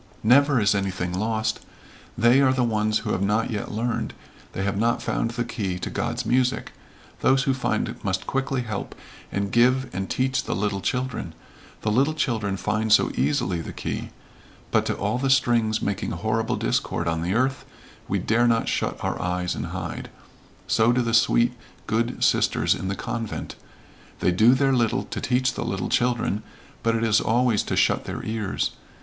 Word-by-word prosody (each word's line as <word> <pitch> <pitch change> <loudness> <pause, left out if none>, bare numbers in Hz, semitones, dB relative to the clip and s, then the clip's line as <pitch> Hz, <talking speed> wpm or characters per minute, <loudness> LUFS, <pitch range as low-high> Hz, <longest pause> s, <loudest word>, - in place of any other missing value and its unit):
"Never 140 +3 +5
is 100 -1 +3
anything 95 -3 -2
lost. 110 +3 -1 0.6
They 120 +4 +5
are 130 -1 +4
the 130 -1 +1
ones 110 -2 +1
who 105 - -1
have 95 - -1
not 105 +4 +1
yet 105 -2 -3
learned 115 +2 -2 0.4
they 95 - -3
have 100 0 -1
not 120 +2 +2
found 115 - -1
the 120 +1 -2
key 95 -7 -3
to 90 - -5
God's - - -2
music. 125 0 +1 0.5
Those 135 +1 +3
who 135 -2 +2
find 130 - -2
must - - -1
quickly 135 -1 -1
help 105 -4 -5 0.4
and 100 0 -2
give 125 +1 +3
and 95 +1 -3
teach 130 +1 0
the - - -2
little 100 -1 -1
children 125 -10 -2 0.5
the 105 - 0
little 140 +7 +2
children 110 -9 -1
find 110 +2 -1
so 110 - +5
easily 75 +6 0
the - - -7
key - - -4 0.6
but - - +2
to - - 0
all 105 +5 -1
the 135 +1 0
strings 120 -4 +2
making 100 -1 -2
horrible 110 +7 -1
discord 85 - -1
on 80 -1 0
the 90 +4 -1
earth 130 +2 +1 0.4
we - - 0
dare 120 +2 +2
not 115 -1 +2
shut - - -1
our - - -2 0.2
ears 90 -1 -1
and - - -4
hide - - -5 0.6
so 115 +1 +3
do 125 0 +2
the 115 -1 -1
sweet, 120 +1 +4 0.3
good 115 +2 -1
sisters - - +3
in 95 - -5
the 100 - -1
convent. 115 +2 -4 0.6
They 90 - +2
do 110 +8 +5
their 135 0 +2
little 120 -3 +1
to - - -6
teach 125 +1 +1
the - - -3
little 95 -1 -2
children, 120 -4 +1 0.4
but 115 0 +1
it 115 - 0
is 110 -1 +3
always 120 -1 +2
to - - -3
shut - - +2
their - - -5
ears. 110 -3 -1
115 Hz, 180 wpm, -24 LUFS, 100-125 Hz, 0.6 s, Never